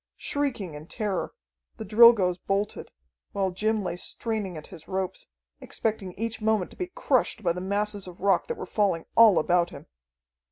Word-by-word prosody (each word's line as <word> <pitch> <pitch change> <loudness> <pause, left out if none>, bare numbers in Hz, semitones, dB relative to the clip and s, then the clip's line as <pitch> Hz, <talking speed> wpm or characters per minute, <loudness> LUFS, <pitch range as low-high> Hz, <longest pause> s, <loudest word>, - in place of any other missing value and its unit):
Shrieking 260 - -2
in 150 +2 -10
terror, 210 -2 -2 0.5
the 220 - -6
Drilgoes 210 -4 +6
bolted, 200 +3 -2 0.4
while 195 -2 0
Jim 215 +3 0
lay 180 - -3
straining 205 -3 -3
at 150 - -9
his 165 -3 -12
ropes, 190 -1 -3 0.3
expecting 210 -5 -3
each 225 +3 -4
moment 215 -4 +1
to - - -14
be 365 - -4
crushed 250 -4 +1
by 170 -2 +2
the 180 - -5
masses 205 +1 -2
of 180 -1 -11
rock 195 -2 +2
that 475 - -4
were 435 - -5
falling 195 -6 0
all 220 -5 +7
about 175 +1 +2
him. 140 -1 -11
200 Hz, 170 wpm, -26 LUFS, 180-220 Hz, 0.5 s, all